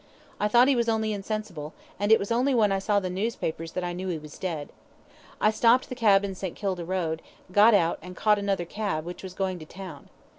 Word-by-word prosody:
I 210 - +2
thought 240 +4 +5
he 275 - +4
was 235 -1 +1
only 220 -1 0
insensible, 195 -7 -5 0.2
and 205 +1 +1
it 220 - +9
was 200 - -5
only 255 +3 +2
when 215 -4 +4
I 195 - +1
saw 205 +1 +2
the 190 - -3
newspapers 180 -5 -3
that 185 - -2
I 175 0 -2
knew 185 +2 -5
he 175 -3 -1
was 150 -1 -11
dead. 160 -6 -3 0.7
I 215 - +4
stopped 235 +3 +3
the - - -4
cab 205 -5 +4
in 195 - -4
St. 185 -2 -5
Kilda 190 -4 -2
Road, 165 -3 -2 0.3
got 210 +3 +6
out 170 -4 +2
and 180 +2 -9
caught 210 -1 +3
another 195 -3 -1
cab, 185 -4 -3
which 175 +1 -7
was 185 -1 -8
going 190 -2 -2
to 155 - -9
town. 185 -6 -10
195 Hz, 230 wpm, -27 LUFS, 175-215 Hz, 0.7 s, it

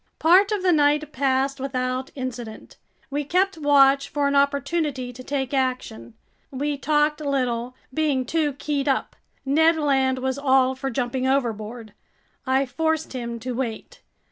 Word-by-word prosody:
Part 370 +6 +5
of 415 -3 -1
the 365 - +4
night 300 -1 +2
passed 270 0 0
without 255 -1 -2
incident. 245 -4 -7 0.3
We 290 +1 -1
kept 365 +4 0
watch 280 -1 +4
for 290 -1 0
an 280 - 0
opportunity 280 -2 0
to 255 +1 -10
take 270 -1 -3
action. 250 - -2 0.3
We 285 +2 -2
talked 300 +1 +1
little, 255 -4 -1 0.2
being 285 -4 0
too 305 +1 0
keyed 285 0 -3
up. 270 - 0 0.3
Ned 320 +4 +3
Land 270 -3 +1
was 260 +1 -2
all 265 -2 +3
for 270 +1 -4
jumping 255 +1 -2
overboard. 230 -4 -2 0.5
I 265 +1 +2
forced 320 +4 -1
him 235 -2 -4
to 255 +2 -4
wait. 255 - -5
275 Hz, 145 wpm, -23 LUFS, 255-295 Hz, 0.5 s, Part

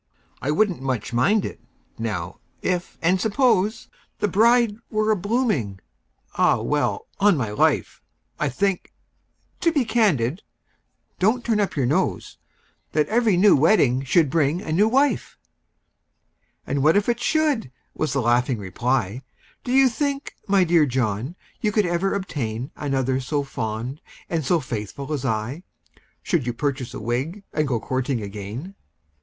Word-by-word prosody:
"I 135 - -2
wouldn't 180 +1 +1
much 125 -3 -3
mind 195 - +3
it, - - -6 0.4
now—if—and 180 0 -2
suppose— 220 -2 +2 0.3
The - - 0
bride 225 +2 +3
were 215 0 +1
a - - +4
blooming—Ah! 170 - -1
well—on 200 -4 +1
my 110 -6 -2
life, 105 - +1 0.4
I - - +1
think—to 200 - -4
be 285 -6 +1
candid—(don't 210 - -1
turn 225 -3 +1
up 205 - 0
your 135 -4 +1
nose!) 135 +5 -1 0.5
That 150 -1 +1
every 225 -4 +3
new 200 +2 +6
wedding 135 - +3
should 145 +1 +3
bring 155 +1 +2
a 165 - -6
new 200 +7 +4
wife!" 270 +5 +1 1.3
"And 140 - -1
what 155 +7 +5
if 205 - +1
it 240 0 +1
should?" 300 - +1 0.2
was 155 - -2
the 140 - +1
laughing 120 +1 +2
reply; 115 +3 -1 0.4
"Do 245 - -4
you 265 +1 +6
think, 280 +3 -2
my 195 -1 +4
dear 165 -3 +4
John, 125 - -1 0.2
you 210 - 0
could 210 -1 +2
ever 175 +3 0
obtain 130 - -4
Another 135 -2 -1
so 140 +2 -1
fond 120 +1 -4 0.3
and 165 -2 0
so 170 +5 +2
faithful 130 +3 -5
as 140 -3 -3
I, 115 +6 -2 0.6
Should 165 - 0
you 120 - -1
purchase 130 0 -3
a - - -5
wig, 130 - -3
and 155 -1 0
go 120 -4 0
courting 130 0 -2
again?" 105 - -7
155 Hz, 140 wpm, -23 LUFS, 125-210 Hz, 1.3 s, new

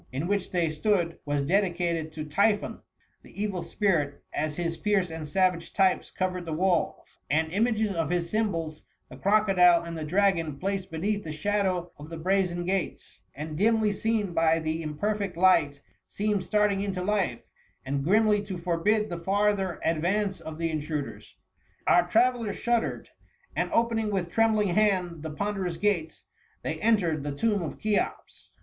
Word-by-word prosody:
In 135 +5 -3
which 200 0 -1
they 170 -3 0
stood, 170 0 0
was 145 -1 0
dedicated 170 -2 0
to 155 -1 -5
Typhon, 200 +8 +1 0.4
the - - -14
evil 200 -4 -1
spirit, 155 -10 0
as 150 0 -1
his 170 0 -2
fierce 195 -3 0
and 160 -1 -6
savage 180 +1 +1
types 190 -2 +2
covered 185 -2 -3
the 160 - -2
walls; 180 +1 -1
and 160 +2 +1
images 220 +1 +1
of 165 -3 -1
his 175 -1 0
symbols, 170 -7 -2 0.3
the - - -10
crocodile 190 -4 +4
and 170 0 -6
the 160 - -4
dragon, 165 -3 +1
placed 195 +2 -3
beneath 205 +6 -2
the 155 - -5
shadow 185 0 -1
of 150 +2 -9
the 165 - -6
brazen 180 0 0
gates, 190 0 -3 0.2
and 155 +2 -6
dimly 215 +3 +3
seen 210 -2 -1
by 165 -1 +3
the 160 0 -2
imperfect 195 +4 -2
light, 170 -6 +4 0.3
seemed 205 -2 -1
starting 210 -1 +1
into 195 -2 -2
life, 190 - 0 0.4
and 135 0 -1
grimly 210 +4 +3
to 200 -3 -6
forbid 180 +5 +1
the 175 -3 -5
farther 195 -1 0
advance 185 +5 0
of 160 -1 -7
the 165 0 -1
intruders. 150 -2 -5 0.5
Our 175 0 +4
travellers 230 0 +2
shud 235 -1 +2
dered, - - -5 0.5
and - - 0
opening 230 -2 +1
with 185 -4 -2
trembling 220 -3 +3
hand 180 -4 +1
the 160 - -5
ponderous 190 +1 -3
gates, 175 -5 -1 0.4
they - - -3
entered 180 -9 +2
the 145 0 -4
tomb 210 +3 +1
of 160 - -5
Cheops. 210 -1 -2
180 Hz, 160 wpm, -27 LUFS, 165-205 Hz, 0.5 s, crocodile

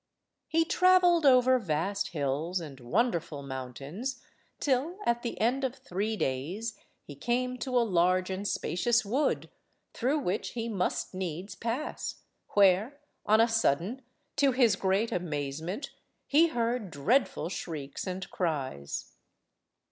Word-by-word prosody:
He 325 0 +2
travelled 355 -3 +5
over 255 0 +6
vast 190 +1 -1
hills 155 +4 -1
and 145 -5 -8
wonderful 165 - 0
mountains 140 - -5 0.4
till, 285 +6 0
at 235 0 +2
the 235 - -4
end 250 +5 +1
of 260 -1 -1
three 215 -4 -3
days, 180 - -2 0.3
he 145 - -10
came 250 - -1
to 250 +1 -1
a 235 - +4
large 185 -1 +2
and 195 +2 -3
spacious 200 +4 +1
wood, 260 +9 0 0.5
through 265 +5 +1
which 205 -8 -2
he 230 -1 -3
must 195 -4 -1
needs 185 +1 -4
pass, 235 +6 -4 0.3
where, 205 +8 +4 0.3
on 215 +1 +5
a 230 - +6
sudden, 225 - +1 0.4
to 275 -2 +4
his 240 -5 +4
great 195 +3 +1
amazement, 165 - -3 0.3
he 315 +4 +5
heard 235 - -1
dreadful 170 - +1
shrieks 155 -4 -5
and 185 0 -4
cries. 135 - -3
205 Hz, 130 wpm, -29 LUFS, 170-250 Hz, 0.5 s, over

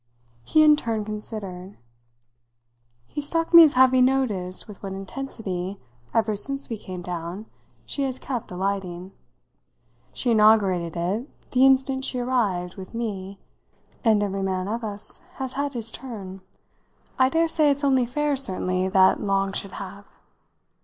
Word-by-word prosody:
He 310 - +4
in 300 -1 +7
turn 225 -6 -2
considered. 205 -3 -7 1.3
"He 295 - -5
struck 330 +3 -1
me 335 - +12
as 305 - +4
having 255 0 +5
noticed 210 -9 0
with 210 -3 -12
what 195 -1 -5
intensity, 195 -3 -5 0.3
ever 220 -2 +1
since 275 +6 -2
we 225 -3 -4
came 185 -3 -8
down, 175 +3 -5 0.4
she 280 - -3
has 265 -2 -1
kept 250 -4 -5
alighting. 185 -1 -3 1.0
She 245 - -1
inaugurated 200 -6 +3
it, 200 - -4
the 260 +1 +5
instant 265 0 +2
she 255 - -2
arrived, 210 -9 -1
with 190 +3 -9
me, 200 -4 -4 0.7
and 215 -3 +3
every 195 -1 -2
man 190 -1 -2
of 230 +3 -3
us 205 -1 -7
has 265 -6 -5
had 285 +1 -2
his 225 -1 0
turn. 200 -8 -8 0.8
I 260 0 +5
dare 330 +4 +2
say 310 -2 +3
it's 285 +1 0
only 260 -3 +3
fair, 295 +3 0
certainly, 185 -7 +2
that 190 -1 +4
Long 195 -1 0
should 195 -1 -3
have." 200 +1 -9
215 Hz, 145 wpm, -24 LUFS, 190-260 Hz, 1.3 s, me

